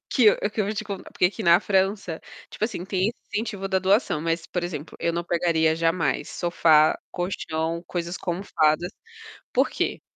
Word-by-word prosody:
que 250 Hz, -, +3 dB
eu 210 Hz, -, +7 dB
que 215 Hz, -, -3 dB
eu -, -, +2 dB
vou 215 Hz, -, -2 dB
te 215 Hz, +1 st, -3 dB
contar, 200 Hz, -2 st, -7 dB
porque -, -, 0 dB
aqui 205 Hz, +4 st, -4 dB
na 170 Hz, -2 st, +6 dB
França, 195 Hz, -3 st, 0 dB, 0.3 s
tipo 215 Hz, -, -2 dB
assim, 200 Hz, -6 st, -4 dB
tem 190 Hz, 0 st, 0 dB
esse 235 Hz, -, -4 dB, 0.2 s
incentivo 205 Hz, -2 st, -2 dB
da 190 Hz, -1 st, +2 dB
doação, 190 Hz, -3 st, +2 dB
mas 165 Hz, 0 st, -1 dB
por 180 Hz, -, -3 dB
exemplo, 165 Hz, -3 st, -5 dB
eu 170 Hz, -, +1 dB
não 170 Hz, +1 st, -2 dB
pegaria 165 Hz, -2 st, +2 dB
jamais 165 Hz, +1 st, 0 dB
sofá, 160 Hz, -3 st, +3 dB
colchão, 170 Hz, -2 st, -3 dB
coisas 175 Hz, 0 st, -3 dB
com 175 Hz, -, -3 dB
almofadas. 170 Hz, -1 st, +1 dB, 0.6 s
Por -, -, +2 dB
quê? -, -, -2 dB
175 Hz, 190 wpm, -25 LUFS, 165-195 Hz, 0.6 s, eu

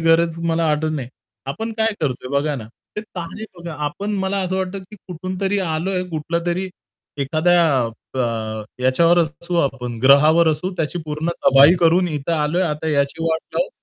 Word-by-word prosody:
गरज 165 Hz, 0 st, +3 dB
मला 165 Hz, 0 st, +1 dB
वाटत 155 Hz, +1 st, +1 dB
नाही. 135 Hz, -6 st, -4 dB, 0.4 s
आपण 225 Hz, +12 st, -4 dB
काय 220 Hz, 0 st, +2 dB
करतोय 130 Hz, -4 st, -2 dB
बघा 150 Hz, +1 st, -1 dB
ना, 110 Hz, -, -7 dB, 0.3 s
ते -, -, -1 dB
तारे 200 Hz, 0 st, -7 dB
बघा, 170 Hz, -1 st, -7 dB
आपण 200 Hz, +8 st, -4 dB
मला 195 Hz, +1 st, -1 dB
असं 185 Hz, +1 st, -2 dB
वाटतं, 190 Hz, +1 st, -2 dB
की 190 Hz, +3 st, -13 dB
कुठूनतरी 185 Hz, +3 st, -2 dB
आलोय, 180 Hz, +1 st, -1 dB
कुठलातरी 170 Hz, +4 st, -2 dB, 0.5 s
एखाद्या 170 Hz, +5 st, +3 dB, 0.5 s
अ, 130 Hz, -, -1 dB, 0.6 s
याच्यावर 165 Hz, +7 st, +4 dB
असू 170 Hz, +2 st, -2 dB
आपण 125 Hz, -5 st, -2 dB
ग्रहावर 155 Hz, +5 st, +6 dB
असू, 155 Hz, +5 st, -2 dB
त्याची 165 Hz, +2 st, -2 dB
पूर्ण 155 Hz, +2 st, -3 dB, 0.2 s
तबाही 140 Hz, +5 st, +8 dB
करून 175 Hz, +2 st, +4 dB
इथे 150 Hz, 0 st, -2 dB
आलोय, 160 Hz, +3 st, +1 dB
आता 155 Hz, -1 st, -2 dB
याची 145 Hz, +2 st, 0 dB
वाट 160 Hz, -1 st, +1 dB, 0.2 s
लावू. -, -, +1 dB
165 Hz, 160 wpm, -20 LUFS, 150-180 Hz, 0.6 s, तबाही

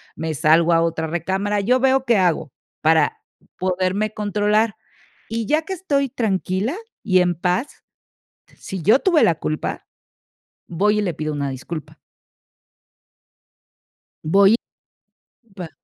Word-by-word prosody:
me 160 Hz, -1 st, -3 dB
salgo 160 Hz, +3 st, +4 dB
a 165 Hz, -, +4 dB
otra 165 Hz, -1 st, -1 dB
recámara, 190 Hz, +5 st, -1 dB
yo 250 Hz, +5 st, +2 dB
veo 265 Hz, 0 st, +2 dB
qué 235 Hz, -, +3 dB
hago 170 Hz, -6 st, +1 dB, 0.3 s
para 160 Hz, -1 st, +3 dB, 0.4 s
poderme 185 Hz, +3 st, -1 dB
controlar. 210 Hz, +1 st, 0 dB, 0.5 s
Y 225 Hz, -1 st, -3 dB
ya 310 Hz, +2 st, +2 dB
que 380 Hz, +4 st, -5 dB
estoy 285 Hz, -7 st, 0 dB
tranquila 210 Hz, -, -1 dB, 0.3 s
y 185 Hz, -4 st, +4 dB
en 175 Hz, -1 st, +1 dB
paz, 180 Hz, -, -2 dB, 0.7 s
si 190 Hz, -, -7 dB
yo 220 Hz, -, +4 dB
tuve 345 Hz, -6 st, +3 dB
la 170 Hz, -, +3 dB
culpa, 155 Hz, -1 st, -4 dB, 0.8 s
voy 210 Hz, +5 st, +1 dB
y -, -, +1 dB
le 185 Hz, -4 st, -1 dB
pido 155 Hz, +1 st, -4 dB
una 140 Hz, -1 st, -2 dB
disculpa. 145 Hz, +4 st, -7 dB, 2.3 s
Voy 195 Hz, +6 st, +5 dB, 1.0 s
Va 175 Hz, -3 st, -6 dB
190 Hz, 125 wpm, -21 LUFS, 165-220 Hz, 2.3 s, Voy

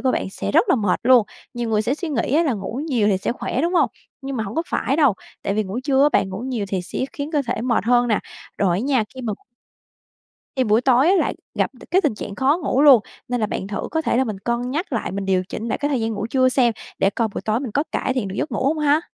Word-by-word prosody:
của 260 Hz, -1 st, +1 dB
bạn 190 Hz, -, -2 dB
sẽ 100 Hz, -, -4 dB
rất -, -, +4 dB
là -, -, +5 dB
mệt 205 Hz, -6 st, 0 dB
luôn. 245 Hz, -3 st, +5 dB, 0.3 s
Nhiều 240 Hz, -1 st, -3 dB
người 215 Hz, -1 st, +2 dB
sẽ 260 Hz, -, 0 dB
suy 335 Hz, +1 st, -5 dB
nghĩ 270 Hz, -1 st, -1 dB
á, 330 Hz, -, +5 dB
là 290 Hz, -, +1 dB
ngủ 220 Hz, +5 st, -4 dB
nhiều 230 Hz, -7 st, +2 dB
thì 190 Hz, -, +2 dB
sẽ 215 Hz, -, -1 dB
khỏe, 255 Hz, -, -3 dB
đúng 345 Hz, +2 st, 0 dB
hông? -, -, +3 dB, 0.3 s
Nhưng 270 Hz, -1 st, -4 dB
mà 220 Hz, -, -1 dB
hông 200 Hz, -, -6 dB
có 325 Hz, -, 0 dB
phải 275 Hz, -, 0 dB
đâu. 285 Hz, -9 st, +4 dB, 0.3 s
Tại 195 Hz, -, -1 dB
vì 215 Hz, -, +1 dB
ngủ 195 Hz, +4 st, -4 dB
trưa 275 Hz, -2 st, +3 dB
á, 290 Hz, -, +6 dB
bạn 190 Hz, -, +2 dB
ngủ 190 Hz, 0 st, -5 dB
nhiều 245 Hz, -3 st, -3 dB
thì 190 Hz, -2 st, -2 dB
sẽ -, -, -6 dB
khiến 290 Hz, +1 st, -5 dB
cơ 290 Hz, -2 st, +2 dB
thể 230 Hz, -2 st, -2 dB
mệt 235 Hz, -4 st, 0 dB
hơn 245 Hz, 0 st, +3 dB
nè. 215 Hz, -, +2 dB, 0.4 s
Rồi 185 Hz, -4 st, +2 dB
á -, -, -1 dB
nha 260 Hz, -4 st, +1 dB
khi 260 Hz, -, -7 dB
mà 220 Hz, -3 st, -2 dB, 1.2 s
Thì 260 Hz, -, +2 dB
buổi 215 Hz, +1 st, +3 dB
tối 260 Hz, +4 st, +4 dB
á, 385 Hz, -, +5 dB
lại -, -, 0 dB, 0.2 s
gặp -, -, 0 dB, 0.2 s
c -, -, -56 dB
cái 370 Hz, +4 st, +4 dB
tình 300 Hz, -, 0 dB
trạng 200 Hz, -1 st, -6 dB
khó 275 Hz, +8 st, +2 dB
ngủ 275 Hz, 0 st, +2 dB
luôn, 275 Hz, -6 st, +8 dB, 0.3 s
nên 245 Hz, -1 st, -1 dB
là 215 Hz, -, +1 dB
bạn 190 Hz, -, -4 dB
thử 200 Hz, -1 st, -4 dB
có 320 Hz, -, 0 dB
thể 240 Hz, -, +1 dB
là 260 Hz, -, +3 dB
mình 215 Hz, -4 st, -4 dB
cân 235 Hz, +4 st, -2 dB
nhắc 310 Hz, +2 st, -3 dB
lại, 220 Hz, -5 st, -2 dB
mình 195 Hz, 0 st, -3 dB
điều 185 Hz, -1 st, +2 dB
chỉnh 230 Hz, +2 st, -5 dB
lại -, -, -1 dB
cái 290 Hz, -, 0 dB
thời 275 Hz, -4 st, 0 dB
gian 225 Hz, 0 st, -1 dB
ngủ 205 Hz, +1 st, -3 dB
trưa 255 Hz, +2 st, +3 dB
xem, 250 Hz, -3 st, +3 dB, 0.3 s
để 195 Hz, -, +3 dB
coi 225 Hz, +1 st, -1 dB
buổi -, -, -3 dB
tối 220 Hz, +3 st, 0 dB
mình 255 Hz, -6 st, -4 dB
có 285 Hz, -, +2 dB
cải 260 Hz, -, 0 dB
thiện 240 Hz, -7 st, -1 dB
được 190 Hz, -, -6 dB
giấc -, -, -1 dB
ngủ -, -, -1 dB
không 305 Hz, +4 st, +1 dB
ha? 300 Hz, 0 st, +3 dB
245 Hz, 300 wpm, -22 LUFS, 215-275 Hz, 1.2 s, luôn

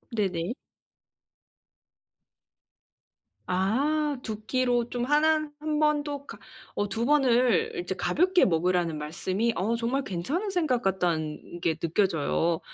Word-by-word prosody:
네네. 185 Hz, -2 st, -1 dB, 2.9 s
아. 195 Hz, +9 st, +1 dB, 0.4 s
2 215 Hz, -1 st, -5 dB
끼로 245 Hz, -1 st, +1 dB
좀 245 Hz, -1 st, -2 dB
하난 310 Hz, +1 st, +2 dB
한 305 Hz, 0 st, -1 dB
번도 290 Hz, -2 st, 0 dB
그러니까 -, -, -10 dB, 0.4 s
어 205 Hz, -, 0 dB
2 230 Hz, +3 st, -1 dB
번을 270 Hz, -, +3 dB
이제 355 Hz, -, -3 dB
가볍게 365 Hz, +1 st, +3 dB
먹으라는 175 Hz, -2 st, +1 dB
말씀이 185 Hz, +9 st, -1 dB
어 215 Hz, +6 st, 0 dB
정말 240 Hz, +4 st, -1 dB
괜찮은 280 Hz, -, -2 dB
생각 315 Hz, -10 st, +1 dB
같다는 175 Hz, -3 st, -2 dB
게 160 Hz, -, +1 dB
느껴져요. 165 Hz, -1 st, 0 dB
230 Hz, 215 characters per minute, -27 LUFS, 180-290 Hz, 2.9 s, 번을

